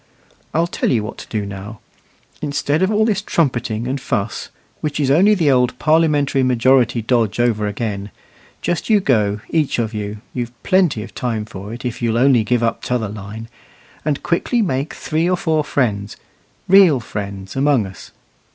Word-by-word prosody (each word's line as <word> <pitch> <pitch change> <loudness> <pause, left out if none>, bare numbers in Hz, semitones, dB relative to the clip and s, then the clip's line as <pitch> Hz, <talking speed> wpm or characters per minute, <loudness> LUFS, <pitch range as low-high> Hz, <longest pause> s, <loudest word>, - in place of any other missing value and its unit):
I'll 165 +2 +2
tell 170 - -1
you 115 -5 +1
what 105 - -7
to - - -9
do 105 -2 -3
now: 100 +2 -8 0.6
instead 145 +1 0
of 190 - +3
all 215 +1 +3
this 205 -3 +1
trumpeting 125 - -1
and 135 +1 -2
fuss, 115 -5 -2 0.3
which 150 -1 -3
is 135 -2 +2
only 195 +8 +5
the 160 -7 +3
old 125 -1 +2
parliamentary 150 -2 +2
majority 125 -1 +3
dodge 115 -2 +1
over 110 -3 +1
again, 105 -1 -3 0.5
just 175 +5 -1
you 215 -2 +5
go, 105 - +1
each 155 -4 +1
of 115 -1 -1
you 105 0 -4 0.2
(you've 120 -1 -4
plenty 180 - +2
of - - -11
time 115 -4 -2
for 100 0 -8
it, 120 +2 -8
if 120 -1 -4
you'll 115 -1 +1
only 125 -2 +4
give 120 +2 +1
up 115 - 0
t'other 120 -4 -1
line), 105 +2 -8 0.6
and 145 -2 -1
quietly 225 +7 +1
make 140 -4 -2
three 160 +3 -1
or 180 - +2
four 160 -3 +1
friends 115 -8 -1 0.5
real 185 -8 +6
friends 100 -3 -6
among 135 -5 +2
us. 95 0 -11
125 Hz, 175 wpm, -19 LUFS, 110-150 Hz, 0.6 s, real